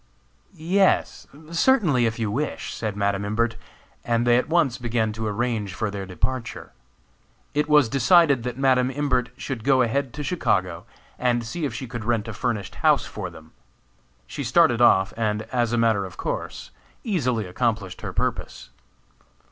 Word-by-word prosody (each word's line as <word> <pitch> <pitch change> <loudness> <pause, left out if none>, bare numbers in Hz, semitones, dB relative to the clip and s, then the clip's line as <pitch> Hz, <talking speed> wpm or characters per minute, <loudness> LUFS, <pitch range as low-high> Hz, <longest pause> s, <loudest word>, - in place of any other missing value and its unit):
"Yes, 185 +4 +1 0.2
certainly, 165 - +3
if 115 - -3
you 110 -3 -2
wish," 145 +7 -3
said 110 -3 -4
Madam 100 -1 0
Imbert; 115 +3 0 0.5
and 120 0 +1
they 120 0 +5
at 125 +5 +1
once 135 -7 +2
began 115 -2 -1
to 110 0 -4
arrange 105 -3 -2
for 110 0 -2
their 100 -1 -5
departure. 115 +8 -4 0.8
It 150 +1 0
was 150 -4 +5
decided 140 +2 +4
that 125 +1 -5
Madam 130 -2 +3
Imbert 130 -3 0
should 130 -5 -5
go 130 -2 +4
ahead 130 +2 -1
to 150 - -4
Chicago, 95 - -1 0.3
and 120 -1 +1
see 155 +7 -3
if 125 -5 -4
she 130 - -5
could 120 -2 -6
rent 115 -1 0
a 115 - -5
furnished 110 -4 -3
house - - +4
for - - -6
them. 80 0 -15 0.7
She 140 - -6
started 130 -1 +3
off, 95 -4 +4
and, 110 -1 -1
as 120 -2 +1
a 120 - +1
matter 115 -3 +2
of 95 -2 -9
course, - - -5 0.3
easily 125 - 0
accomplished 100 -1 -2
her - - -5
purpose. - - -3
120 Hz, 165 wpm, -24 LUFS, 110-135 Hz, 0.8 s, they